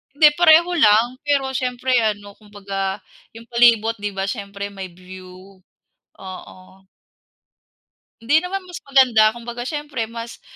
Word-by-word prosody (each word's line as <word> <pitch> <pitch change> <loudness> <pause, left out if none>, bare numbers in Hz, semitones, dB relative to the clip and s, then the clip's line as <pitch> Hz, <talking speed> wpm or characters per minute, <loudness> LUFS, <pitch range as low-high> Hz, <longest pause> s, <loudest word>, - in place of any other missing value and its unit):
Hindi, 300 +1 +7
pareho 340 +1 +6
lang. 240 -2 +3
Pero 280 -2 0
siyempre 255 0 -3
ano, 205 -2 -2
kumbaga 200 -2 -5 0.3
yung 230 +1 -13
palibot 230 -2 +3
di 205 0 -4
ba 195 - -2
siyempre 200 -2 -5
may 195 -1 -7
view. 185 +1 -14 0.6
Oo. 185 -1 -10 1.6
Hindi 290 +8 +2
naman 370 +1 -5
mas 355 -2 -9
maganda. 255 -6 +4
Kumbaga, 235 0 -8
siyempre 290 -4 -5
mas 230 0 -9
230 Hz, 125 wpm, -20 LUFS, 200-265 Hz, 1.6 s, Hindi